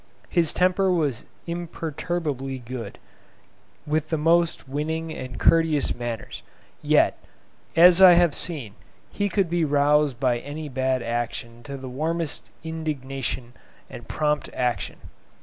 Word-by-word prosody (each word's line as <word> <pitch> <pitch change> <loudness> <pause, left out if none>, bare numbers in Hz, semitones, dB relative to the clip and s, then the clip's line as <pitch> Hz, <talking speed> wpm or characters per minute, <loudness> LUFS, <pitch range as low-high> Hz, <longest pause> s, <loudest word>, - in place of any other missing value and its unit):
His 170 -4 +2
temper 185 +1 +2
was 150 -9 0 0.2
imperturbably 165 -5 -3
good, 125 -1 -7 0.9
with 155 +1 -1
the 160 - 0
most 165 0 +2
winning 160 +3 -3
and 130 -1 -7
courteous 165 -3 +3
manners; 120 -2 -5 0.4
yet, - - +3 0.6
as 175 +2 +7
I 185 -2 +10
have 170 -3 +4
seen, 140 - -2 0.4
he 205 0 -1
could 195 -2 +1
be 170 0 0
roused 145 -2 +3
by 125 -3 +1
any 150 +3 -7
bad 130 -1 0
action 115 0 -4
to 140 -1 -6
the 130 0 -8
warmest 160 +4 -2
indignation 135 -6 -4 0.4
and 120 - -10
prompt 150 -1 0
action. 120 -10 -1
150 Hz, 125 wpm, -24 LUFS, 130-165 Hz, 0.9 s, I